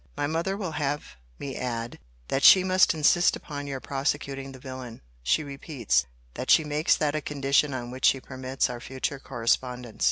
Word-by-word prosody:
My 145 - 0
mother 165 +6 -1
will 185 -5 -4
have 145 - -3 0.2
me 135 -2 -6
add, 120 -1 -4 0.3
that 135 - 0
she 185 - +9
must 185 -2 +4
insist 160 +3 +4
upon 145 -2 -7
your 135 -1 -4
prosecuting 135 0 -3
the 130 - -11
villain. 130 -3 -8 0.2
She 65 - +1
repeats, 140 - -1 0.3
that - - -6
she 160 - +6
makes 150 +1 +2
that 150 -2 0
a 155 - -1
condition 140 0 +1
on 120 -2 -5
which 130 +1 -2
she 135 - +5
permits 130 0 -2
our 120 -1 -6
future 135 +2 -4
correspondence. 125 -1 -2
135 Hz, 180 wpm, -27 LUFS, 130-150 Hz, 0.3 s, she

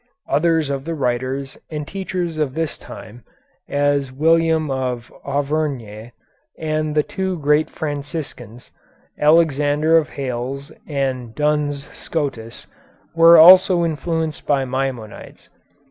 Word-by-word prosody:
Others 160 -2 +1
of 135 0 -4
the 165 0 -3
writers 130 0 -3
and 150 -2 -5
teachers 185 -4 -4
of 145 -3 -1
this 160 -2 -2
time, 115 +2 -12 0.5
as 145 -1 0
William 160 +1 +2
of 125 -3 -3
Auvergne, 140 -6 -3 0.5
and 155 -1 -2
the 150 - +3
two 190 +1 -3
great 150 +1 +2
Franciscans, 145 -6 -6 0.5
Alexander 150 0 +3
of 155 - -5
Hales 135 +1 -4 0.2
and 130 -5 -3
Duns 150 -1 -1
Scotus, 135 -8 -4 0.5
were 165 +1 +7
also 180 +1 +7
influenced 160 0 -3
by 140 -2 +2
Maimonides. 130 -4 -5
145 Hz, 110 wpm, -20 LUFS, 135-160 Hz, 0.5 s, were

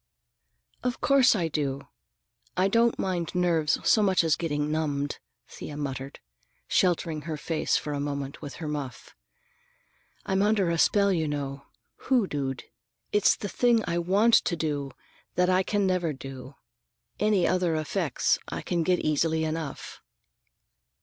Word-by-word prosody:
"Of 250 0 -1
course 270 -4 +5
I 175 -5 0
do. 140 -3 -3 0.7
I 185 +1 +3
don't 230 +3 +3
mind 180 -3 -2
nerves 170 -4 +2
so 220 - +5
much 190 -4 +3
as 160 -2 +3
getting 150 -2 -2
numbed," 145 -2 -2 0.3
Thea 145 - -8
muttered, 135 -1 -5 0.5
sheltering 170 -3 +1
her 155 - -2
face 160 +1 0
for 150 - -4
a 145 - -2
moment 140 -1 -4
with 145 - -7
her 160 - -6
muff. 145 -3 -6 1.1
"I'm 190 0 +1
under 205 -4 +2
a 170 - -1
spell, 200 +1 +4
you 160 -3 0
know, 140 -1 -4 0.4
hoodooed. 145 - 0 0.5
It's 210 - +4
the 205 - -5
thing 235 +2 +2
I 170 0 -1
want 200 +7 +3
to 175 - +4
do 145 -4 -2 0.5
that 180 +1 +3
I 185 0 +4
can 205 +1 0
never 180 -4 0
do. 135 0 -9 0.6
Any 210 -4 +3
other 180 -3 +1
effects 155 -2 0
I - - -5
can 170 -1 -1
get 180 +2 +1
easily 160 +1 +1
enough." 155 -2 -5
165 Hz, 145 wpm, -27 LUFS, 145-190 Hz, 1.1 s, course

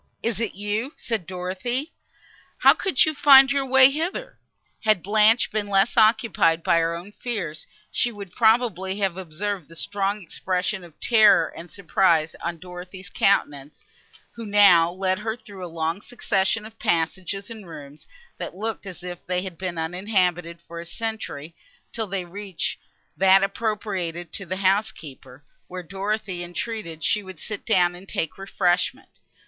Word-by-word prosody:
is 225 -3 -1
it 230 -2 -2
you?" 210 +7 -3
said 220 -8 -3
Dorothée, 190 - -3 0.7
"How - - +7
could 330 -10 +2
you 310 - -1
find 275 -2 +7
your 275 -1 0
way 265 +1 +7
hither?" 335 - -4 0.4
Had 215 -5 +2
Blanche 215 +3 +4
been 210 -1 -2
less 195 +3 +2
occupied 215 -7 +3
by 170 - +3
her 165 0 0
own 175 +4 -9
fears, 205 -10 -5 0.2
she 240 - 0
would 200 -4 -9
probably 220 -5 +2
have 195 -4 0
observed 190 0 -4
the 165 - -14
strong 200 +3 -1
expressions 185 +2 -2
of 165 -3 -18
terror 215 -8 +5
and 170 +1 -10
surprise 170 -4 +1
on 170 0 -3
Dorothée's 180 +2 -10
countenance, 145 -7 0 0.5
who 230 - -9
now 200 -5 +6
led 185 +1 -1
her 220 +1 -3
through 200 -5 -11
a - - -4
long 165 +3 -2
succession 210 -2 -1
of 220 0 -13
passages 185 +5 -1
and 215 -5 -10
rooms, 145 -2 -11 0.3
that - - -6
looked 215 +1 -4
as 180 -1 -9
if 175 -1 -7
they 180 0 -1
had 185 -3 -6
been 185 -2 -4
uninhabited 180 -1 -1
for 170 0 -8
a 170 - -7
century, 195 -8 -5 0.4
till 220 -2 -2
they 190 -2 -3
reached 195 0 -5 0.4
that 195 +1 +5
appropriated 195 -5 -3
to 195 -4 -5
the 185 +2 -3
housekeeper, 155 - -2 0.2
where 180 0 -7
Dorothée 195 0 -3
entreated 175 -2 -5
she 210 - +2
would 190 -4 -11
sit 215 -2 -6
down 180 -5 +3
and 180 +2 -12
take 160 +3 -3
refreshment. 185 -2 0
190 Hz, 155 wpm, -24 LUFS, 175-215 Hz, 0.7 s, How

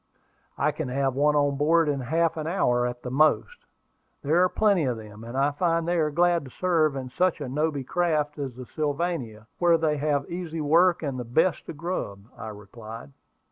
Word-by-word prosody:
"I 150 +3 +2
can 150 -1 -4
have 135 +1 0
one 150 +3 +2
on 145 -1 +2
board 160 +3 +3
in 145 -2 0
half 165 +6 0
an 155 -1 -4
hour 125 -9 +1
at 120 0 -7
the 125 - -5
most. 155 - +1 0.6
There 160 +5 +3
are 185 - +4
plenty 200 -7 +2
of 125 -3 -1
them, 110 0 -11
and 120 +3 -6
I 140 +2 +2
find 165 +2 0
they 175 0 +1
are 155 -1 +2
glad 170 +2 +2
to - - -10
serve 160 -1 +1
in 130 -2 -5
such 180 +4 +1
a 145 - -4
nobby 145 +1 -1
craft 150 -1 0
as 135 -4 -4
the 125 0 -8
Sylvania, 145 -7 -3
where 170 -1 +4
they 155 -2 0
have 145 -1 0
easy 170 -2 -4
work 170 +4 +3
and 135 -4 -3
the - - -3
best 155 +8 0
of 155 - -7
grub," 145 - -4
I 115 - -8
replied. 110 -3 -10
150 Hz, 205 wpm, -26 LUFS, 130-165 Hz, 0.6 s, are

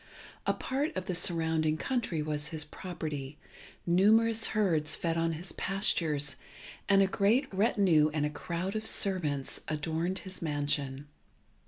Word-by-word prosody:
A - - +3
part 275 +4 -2
of 185 -1 -3
the 185 - -2
surrounding 160 -3 +1
country 225 - -1
was 150 -1 -2
his 160 -2 -4
property, 150 -4 -6 0.5
numerous 220 +5 +4
herds 160 -7 +1
fed 165 -1 -1
on 165 0 0
his 170 +3 -7
pastures, 160 -7 0 0.5
and 195 -1 +6
a - - +4
great 210 +8 +2
retinue 190 -7 +3
and 150 -1 0
a 150 - -2
crowd 175 +6 -4
of 215 0 -2
servants 155 -11 0
adorned 160 +4 -2
his 185 0 -9
mansion. 145 -3 -1
165 Hz, 140 wpm, -30 LUFS, 150-195 Hz, 0.5 s, and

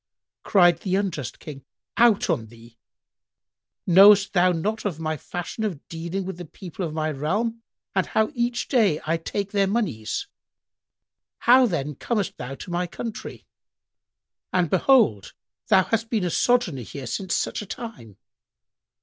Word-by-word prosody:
Cried 175 -4 +4
the 185 0 -1
unjust 170 - -2
King, 140 -4 -10 0.3
"Out 235 -3 +4
on 140 -11 -1
thee! 115 +1 -17 1.1
Knowest 195 +2 +7
thou 180 -1 +4
not 205 +6 -2 0.2
my 155 -1 -2
fashion 175 +7 -6
of 180 -9 -4
dealing 170 +3 -4
with 190 -2 -6
the 175 - -6
people 180 +3 -8
of 165 - -3
my 155 0 -1
realm 210 +11 -2 0.3
and 190 - +1
how 220 +4 +1
each 240 -1 -1
day 210 - +2
I 165 +2 +1
take 200 +4 -4
their 200 -1 +2
monies? 185 - -2 1.1
How 250 +1 +5
then 150 -7 -2
comest 205 - -2
thou 130 +2 -6
to 175 - -9
my 175 +1 -1
country? 220 +5 -7 1.1
And 180 -4 +1
behold, 225 - +3 0.3
thou 190 - +5
hast 225 +2 -1
been 220 -5 0
a 175 - -1
sojourner 240 - +1
here 135 +3 -8
since 190 - -2
such - - -2
a 210 - -9
time!" 195 - -8
180 Hz, 150 wpm, -24 LUFS, 155-215 Hz, 1.1 s, Knowest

